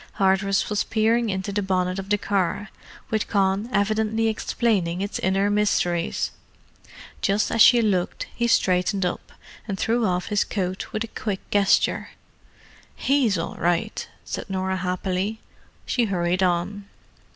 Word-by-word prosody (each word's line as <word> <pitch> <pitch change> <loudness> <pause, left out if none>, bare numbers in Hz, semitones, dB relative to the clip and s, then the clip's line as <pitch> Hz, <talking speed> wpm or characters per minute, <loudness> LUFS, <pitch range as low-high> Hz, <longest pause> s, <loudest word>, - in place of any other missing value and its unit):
Hardress 195 0 +2
was 210 -1 0
peering 225 +1 +1
into 190 0 -2
the 205 +1 -1
bonnet 185 -1 0
of 195 0 -7
the 210 - +3
car, 200 0 -1 0.4
with 220 -1 0
Con 195 +2 +1
evidently 220 +2 +1
explaining 205 -5 0
its 200 +1 -3
inner 195 +1 +1
mysteries; 180 -5 +1 0.9
just 200 +1 +1
as 230 - +2
she 240 0 +7
looked, 185 -5 0
he 235 - 0
straightened 185 -2 +2
up, 180 - -4 0.4
and 195 -3 -3
threw 230 +2 +1
off 180 +2 -1
his 210 -1 +2
coat 185 -2 -3
with 215 - -2
a - - -5
quick 205 -3 -5
gesture. 200 -1 +2 0.9
"He's 265 -8 +2
all 165 - -4
right," 170 0 -1 0.2
said - - -5
Norah 190 0 -1
happily. 185 +3 -2 0.5
She 245 -2 +1
hurried 180 -2 0
on. 185 +3 0
200 Hz, 140 wpm, -24 LUFS, 185-215 Hz, 0.9 s, she